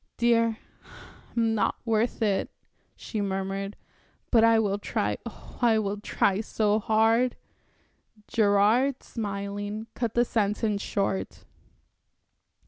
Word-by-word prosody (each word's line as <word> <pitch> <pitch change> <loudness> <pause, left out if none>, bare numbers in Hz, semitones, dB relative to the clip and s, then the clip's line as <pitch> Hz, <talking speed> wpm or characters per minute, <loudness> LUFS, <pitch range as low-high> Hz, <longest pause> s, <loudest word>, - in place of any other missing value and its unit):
"Dear, 230 -1 +3 0.8
I'm 225 -1 +2
not 215 - +1
worth 225 0 0
it," 200 -3 +1 0.5
she 215 - -4
murmured, 195 0 -3 0.6
"but 230 -2 +5
I 230 0 +6
will 205 -2 +1
try - - -2
oh, - - -12
I 230 -2 +4
will 205 -1 -1
try 200 -1 0
so 215 -1 +1
hard."... 225 +3 +2 0.9
Gerard, 220 +5 +3
smiling, 205 0 -4
cut 235 -3 -3
the 240 0 +4
sentence 210 -1 0
short. 195 -2 -2
215 Hz, 110 wpm, -27 LUFS, 200-230 Hz, 0.9 s, I